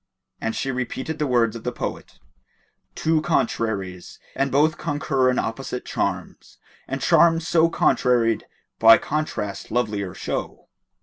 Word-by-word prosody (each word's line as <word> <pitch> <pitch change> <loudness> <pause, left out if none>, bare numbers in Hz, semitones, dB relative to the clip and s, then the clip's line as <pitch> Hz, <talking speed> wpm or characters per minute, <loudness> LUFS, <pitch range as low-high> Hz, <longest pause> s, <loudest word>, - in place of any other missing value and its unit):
And 115 - -3
she 135 - -2
repeated 130 +4 -4
the 150 - 0
words 120 -3 +2
of 115 - -8
the 125 - -2
poet, - - -6 0.8
"Two 160 -1 +1
contraries, 110 - -2 0.2
and 135 -1 0
both 150 +3 +2
concur 135 -3 0
in 125 - 0
opposite 125 +2 -3
charms, - - -4
* - - -30
And 135 0 -4
charms 165 0 +4
so 165 0 +4
contraried 120 -8 +2 0.3
by 115 0 +8
contrast 120 -10 -4
lovelier 105 -5 -2
show." - - -5
130 Hz, 135 wpm, -23 LUFS, 115-155 Hz, 0.8 s, by